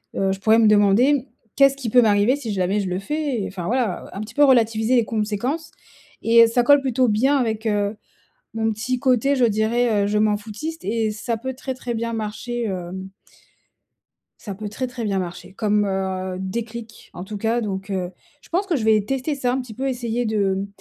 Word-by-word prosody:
heu, 195 0 +1
je 190 - -3
pourrais 220 +3 +4
me 220 - +5
demander: 220 +7 +4 0.3
«Qu'est-ce 275 -1 +5
qui 250 -4 -4
peut 245 +3 +6
m'arriver 215 +4 +3
si 230 -7 -4
jamais 190 +2 0
je 195 - -2
le 180 +1 -2
fais?» 290 +1 -2
et, - - -3
enfin, 185 -3 -6
voilà, 240 -4 -1
heu, - - -12
un 200 - -5
petit 215 +2 -8
peu 290 - +6
relativiser 225 -2 +3
les 240 - +4
conséquences, 225 +9 -2 0.5
et 230 0 +6
heu, - - +1
ça 240 +2 +2
colle 285 +3 +6
plutôt 255 -2 +1
bien 260 +7 +2
avec, 225 -3 -1
heu, 205 0 0 0.6
mon 225 0 0
petit 245 +4 -2
côté, 265 +2 +2
je 250 - +3
dirais, 220 0 +2
heu, - - 0
je 210 - +1
m'en 210 -1 +3
foutiste 230 +11 -7
et 220 0 0
ça 225 +2 -3
peut 260 +3 -5
très, 265 0 -5
très 245 -1 -5
bien 230 +1 -2
marcher, 230 +2 -4
hem 190 -1 -5 1.3
ça 205 - -6
peut 210 +1 -6
très, 255 +5 -3
très 245 -1 -6
bien 200 -2 0
marcher. 180 +1 -7
Comme, 210 0 +1
heu, 190 -1 -2
déclic 225 +4 -6
en 180 - -7
tout 205 +1 -6
cas, 230 +3 0
donc 195 -1 -4
heu, 185 -2 -2 0.3
je - - -20
pense 375 +4 0
que 350 - +1
je 240 - -1
vais 220 -1 +4
tester 270 +4 -2
ça 250 -2 0
un 260 - 0
petit 235 -3 -10
peu, 270 +4 -3
essayer 240 -2 -2
de, 205 -3 +1
mmh, 195 +1 -3
225 Hz, 220 wpm, -22 LUFS, 205-250 Hz, 1.3 s, peut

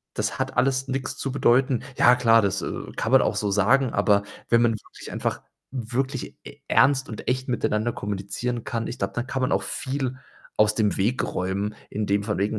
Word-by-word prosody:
„das - - -2
hat - - -3
alles 130 +1 +1
nix 130 0 -3
zu 135 - -3
bedeuten.” 130 -1 +3
Ja 125 - +6
klar, 115 -2 +5
das, 100 -2 0
äh, - - -2 0.3
kann - - -2
man - - +7
auch - - 0
so 105 - 0
sagen, 120 +6 +3
aber 100 -1 +3 0.3
wenn 115 0 +4
man 115 -1 +3
wirklich 110 - -10
einfach - - -2 0.3
wirklich 130 +2 -3
e - - -11
ernst 135 0 +4
und 110 - -7
echt 130 +1 -1
miteinander 120 -1 0
kommunizieren 105 +4 -4
kann, 115 -1 -3
ich 120 - -6
glaube, - - -2
da 120 - -1
kann 130 +1 -3
man 130 - +1
auch - - +2
viel 130 -1 -3 0.4
aus 105 0 +4
dem 105 -2 +1
Weg 115 +7 +1
räumen, 100 +3 -2 0.2
in 105 0 -2
dem 100 +1 +1
von 105 -3 -2
wegen: 105 +2 0
120 Hz, 205 wpm, -25 LUFS, 105-130 Hz, 0.4 s, man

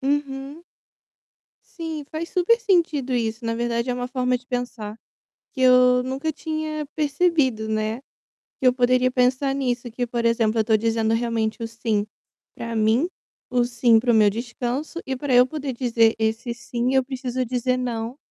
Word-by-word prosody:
Uhum. 280 +2 -2 1.1
Sim, 320 -3 -5
faz 325 +2 -4
super 370 +7 +2
sentido 320 - +1
isso. 230 0 -2
Na 230 - 0
verdade, 235 +1 -1
é 250 - 0
uma 245 0 -3
forma 250 -1 0
de 250 +1 -15
pensar, 245 -4 -4 0.6
que 260 - -4
eu 250 -1 +5
nunca 270 +5 -3
tinha 310 0 -4
percebido, 290 -7 +1
né. 215 +1 -1 0.6
Que 260 - +1
eu 250 - +5
poderia 255 0 +3
pensar 255 +2 +1
nisso, 250 -3 -2
que, 245 +2 -3
por 235 0 -1
exemplo, 225 -1 +2
eu - - +2
tô 220 0 +4
dizendo 225 0 +1
realmente 230 -1 -1
o - - -1
"sim" 225 -2 -1 0.5
pra 230 0 -5
mim, 220 +9 +2 0.4
o 250 -1 +2
"sim" 235 -1 +4
para 240 +2 +2
o - - +3
meu 215 -2 +6
descanso 245 - -4
e 265 - -2
pra 275 +1 -3
eu 250 +1 +7
poder 280 -1 -4
dizer 235 -2 +2
esse 225 +2 -1
"sim", 240 +1 -2
eu 265 - +4
preciso 255 -1 -3
dizer 250 +1 0
"não" 240 -1 -3
250 Hz, 170 wpm, -23 LUFS, 230-270 Hz, 1.1 s, eu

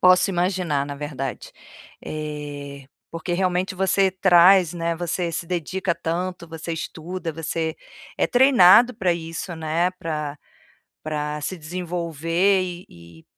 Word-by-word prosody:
posso 185 +1 +5
imaginar, 175 -5 0
na 145 - -5
verdade. 140 -2 -5 0.5
Eh, 145 -2 -6 0.2
porque 165 +2 -4
realmente 185 +1 0
você 190 0 +2
traz, 185 -1 +5
né, 170 -1 -2
você 175 0 -2
se 170 - -4
dedica 180 +1 -2
tanto, 170 +1 -3
você 165 +1 -6
estuda, 165 +1 -5
você 160 0 -3 0.4
é - - +2
treinado 245 -2 +6
pra 190 -5 +1
isso, 165 +1 -5
né, 160 +3 0
pra 150 -4 -4 0.7
pra 150 -1 -3
se 185 +5 -4
desenvolver, 170 +2 0
e 180 0 -6
e, 85 -1 -16
170 Hz, 125 wpm, -23 LUFS, 155-185 Hz, 0.7 s, treinado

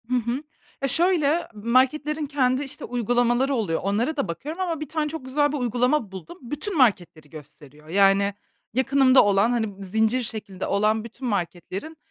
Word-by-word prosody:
Hı 250 - +1
hı. 245 +4 -1 0.4
Ya, 275 - +1
şöyle, 335 +1 +2
marketlerin 265 +8 +1
kendi, 270 -2 +1
işte, 270 - -4
uygulamaları 245 +2 +1
oluyor, 195 -9 -1
onlara 225 +10 0
da 275 - -1
bakıyorum 295 - -5
ama 340 -4 -2
bir 305 -2 -6
tane 310 -2 -1
çok 315 -3 -7
güzel 290 +2 +1
bir 295 - -2
uygulama 245 -1 0
buldum. 195 - -10
Bütün 295 - -4
marketleri 180 - +1
gösteriyor. 150 0 -14
Yani, 195 +3 +3 0.4
yakınımda 265 +1 +4
olan, 205 +3 +3
hani, 215 -5 -2
zincir 220 +6 +1
şeklinde 205 -4 -6
olan 215 +2 +1
bütün 235 +3 -7
marketlerin, 195 - -4
245 Hz, 160 wpm, -24 LUFS, 200-285 Hz, 0.4 s, yakınımda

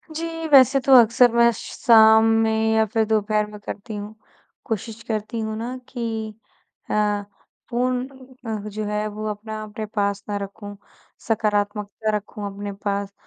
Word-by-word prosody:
जी, 330 0 -4
वैसे 275 -1 +6
तो 270 +1 +3
अक्सर 235 +2 +5
मैं 235 0 +5
शाम 220 0 +5 0.2
में 220 0 +1
या 220 0 +4
फिर 220 +1 0
दोपहर 215 -1 +1
में 210 0 -11
करती 205 +1 -7
हूँ, 205 +1 -7 0.5
कोशिश 225 0 -4
करती 220 +1 -3
हूँ 220 -1 -3
ना, 240 +3 -5
कि 225 -3 -4 0.6
अ, 210 -1 +1 0.5
फ़ोन 250 +1 -1 0.4
अ, 220 -1 -2
जो 215 +1 -5
है 210 0 -2
वो 215 +1 -5
अपना 215 +1 -6
अपने 215 0 -6
पास 200 -2 -2
ना 205 - -1
रखूँ। 205 +1 -9 0.5
सकारात्मकता 210 -1 -1
रखूँ 210 0 -6
अपने 205 +1 -6
पास 200 0 -2
220 Hz, 150 wpm, -22 LUFS, 210-230 Hz, 0.6 s, वैसे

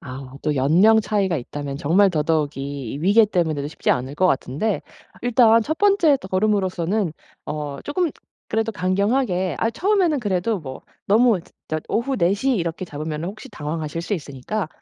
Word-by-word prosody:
아 130 0 -9
또 150 -1 0
연령 180 +12 +5
차이가 200 -5 0
있다면 140 +2 -5
정말 190 +6 +4
더더욱이 145 -5 -1
이 140 - -5
위계 205 +6 +5
때문에도 160 -8 -1
쉽지 - - -1
않을 130 +3 -1
것 185 +5 +2
같은데 165 +7 0 0.4
일단 230 -2 +5
1 315 +7 -3
번째 390 -8 +4
더 190 - -9
걸음으로서는 190 -2 0 0.3
어 145 -2 -4
조금 330 +2 0 0.4
그래도 225 0 0
강경하게 190 0 0
아 225 - +1
처음에는 365 - +1
그래도 200 -1 -1
뭐 130 -3 -8 0.2
너무 220 -2 +4 0.3
저 155 0 -2
오후 255 +4 0
4:00 200 +9 +2
이렇게 170 -1 -2
잡으면은 155 +1 -5
혹시 215 +7 -9
당황하실 155 -2 -4
수 205 - -1
있으니까 155 +4 -4
185 Hz, 340 characters per minute, -22 LUFS, 150-220 Hz, 0.4 s, 연령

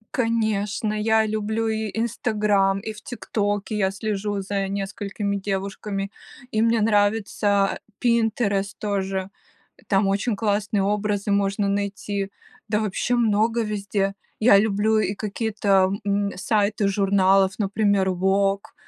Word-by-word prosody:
Конечно, 215 -3 0
я 220 +1 +2
люблю 215 +1 -1
и 220 -1 -2
"Инстаграм", 210 -4 +1
и 220 +1 -6
в 210 - -13
"Тиктоке" 205 -3 -2
я 190 -2 +1
слежу 205 0 -2
за 195 0 -2
несколькими 200 +1 -3
девушками, 195 0 -3 0.4
и 215 - +1
мне 230 0 +3
нравится 205 -1 +2 0.2
"Пинтерест" 225 -4 +1
тоже. 195 -2 -2 0.6
Там 195 0 +2
очень 205 +3 0
классные 205 -1 0
образы 205 0 -1
можно 200 0 +1
найти, 200 0 -2 0.4
да 210 0 +1
вообще 215 +4 -1
много 225 0 +2
везде. 200 -2 -1 0.3
Я 215 -3 +7
люблю 215 +1 +2
и 205 -1 0
какие-то, 205 -2 +1
м, 200 0 0
сайты 205 +1 +1
журналов, 195 -1 +3
например, 200 -1 +2
"Вог", 195 +2 0
205 Hz, 120 wpm, -23 LUFS, 195-215 Hz, 0.6 s, Я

